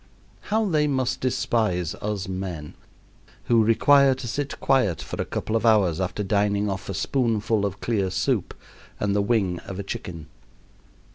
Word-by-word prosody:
How 220 +1 +2
they 155 -4 +2
must 130 -3 0
despise 110 -9 0
us 105 -2 -4
men, 90 -5 -5 0.7
who 115 -2 +3
require 135 +4 +5
to 130 -1 -7
sit 140 +4 -3
quiet 125 - +2
for - - -5
a - - -2
couple 110 - -3
of 115 - +1
hours 100 -7 +3
after 95 +3 -2
dining 100 0 +1
off 95 0 -6
a 100 - -3
spoonful 110 -2 0
of 100 0 -8
clear 100 -5 0
soup 90 - -1 0.4
and 100 -1 0
the 100 - +3
wing 100 -5 +1
of 95 - -8
a 100 - -4
chicken! 85 -4 -6
105 Hz, 160 wpm, -24 LUFS, 95-120 Hz, 0.7 s, require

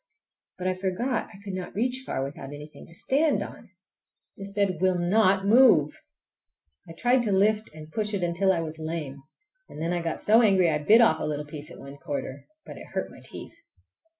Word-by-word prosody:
But 185 - -6
I 185 - +1
forgot 195 +7 -2
I 200 - -13
could 200 -2 -6
not 185 -1 -6
reach 250 +4 -1
far 135 - -3
without 140 0 -7
anything 150 +1 -11
to - - -15
stand 290 - +1
on! - - -11 0.7
This 195 0 -9
bed 195 -4 0
will 185 -1 +2
not 190 +2 +2
move! 215 - +5 0.9
I - - -8
tried 245 +8 +2
to 220 -3 0
lift 210 +3 +2
and 155 0 -12
push 210 +2 0
it 190 - -2
until 175 +3 +2
I 170 -3 0
was 160 0 -6
lame, 155 -4 -5 0.5
and - - -10
then 165 +2 -1
I 175 - -1
got 165 -1 -3
so 220 +3 +5
angry 190 -6 +4
I 150 - 0
bit 215 +10 +6
off 230 - +4
a - - -4
little 150 0 -3
piece 150 0 -7
at - - -11
one 140 +1 -11
corner—but 140 - -7
it - - -11
hurt - - -2
my - - -14
teeth. - - -8
185 Hz, 205 wpm, -26 LUFS, 155-215 Hz, 0.9 s, bit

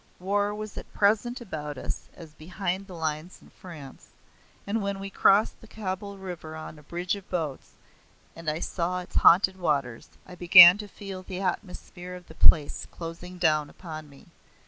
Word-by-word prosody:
War 205 +2 0
was 215 -1 -6
at - - -13
present 220 +4 +2
about 150 - -6
us - - -6
as 160 -3 -12
behind 185 +4 -4
the 185 - -10
lines 160 +2 -4
in - - -19
France; 150 -7 -12 0.6
and 210 +2 -1
when 200 -1 -3
we 195 0 -6
crossed 200 +2 +3
the 225 - -14
Kabul 200 -1 -5
River 175 -4 -8
on 155 -1 -9
a - - -15
bridge 175 +5 -3
of 200 -2 -12
boats, 160 -7 -4 0.6
and 165 -1 -4
I 155 +2 -3
saw 180 +1 -2
its 180 - -6
haunted 190 +2 +5
waters, 140 -8 -1 0.2
I 180 - -12
began 180 +1 +9
to 210 - -6
feel 195 -2 -8
the 185 0 -6
atmosphere 180 -1 -5
of 180 -1 -13
the - - -11
place 150 -2 +3
closing 175 +2 -8
down 155 -4 +2
upon 155 -4 -9
me. 140 -1 -17
180 Hz, 175 wpm, -27 LUFS, 160-195 Hz, 0.6 s, began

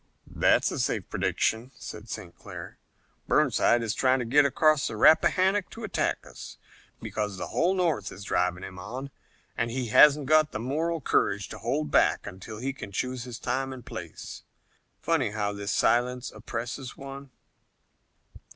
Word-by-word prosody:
"That's - - +2
a - - -4
safe - - -1
prediction," 115 +3 0
said 105 -1 -9
St. 95 -6 -7
Clair. - - -10 0.5
"Burnside 120 0 +3
is 110 -1 -1
trying 130 0 +3
to 125 - -2
get 140 +5 +5
across 155 +2 +3
the - - -5
Rappahannock 185 - +4
to 230 - -10
attack 215 - -1
us, - - -10 0.4
because 105 -2 -3
the - - -5
whole 180 +3 +1
North 165 - 0
is 100 - -9
driving 90 -2 0
him 95 -1 -8
on, 130 +9 -6 0.4
and 115 - -1
he 125 0 -3
hasn't 150 +4 +7
got 155 +1 +4
the - - -3
moral 160 +7 -1
courage - - +1
to - - -8
hold 75 -1 -2
back - - +3
until 95 +4 -8
he 135 +4 -3
can 120 -7 -9
choose 125 +4 -3
his 120 -2 -7
time 130 +2 -2
and 130 -3 -9
place. - - -8 0.6
Funny 160 -9 +1
how 105 -1 -2
this 100 0 -4
silence 125 +4 +1
oppresses 125 +2 -6
one." 135 0 -9
125 Hz, 160 wpm, -27 LUFS, 105-140 Hz, 0.6 s, hasn't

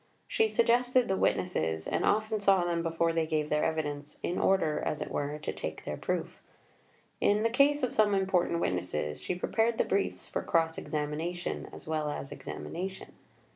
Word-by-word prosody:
She 445 - +2
suggested 245 - +3
the 190 - +1
witnesses, 80 - 0
and - - 0
often 215 +1 +2
saw 195 -3 +4
them 170 -1 0
before 165 0 +1
they 165 -1 +1
gave 155 -1 0
their 150 0 +2
evidence, 150 -2 -2
in 175 - -1
order, 160 -6 +2
as 150 - -1
it - - -5
were, 145 +1 -2
to 150 - -4
take - - -5
their - - -3
proof. - - -3 0.8
In 205 +1 +3
the 230 - +2
case 280 +3 +4
of 255 - 0
some 210 -2 +4
important 185 -3 +1
witnesses, 75 -5 -2
she 180 - -2
prepared 225 +5 +1
the - - +2
briefs 195 0 -1
for - - -2
cross 160 -1 +1
examination, 155 +3 -3
as - - -11
well 155 -1 -1
as 145 -1 -5
examination. 190 +3 -6
170 Hz, 175 wpm, -30 LUFS, 150-205 Hz, 0.8 s, saw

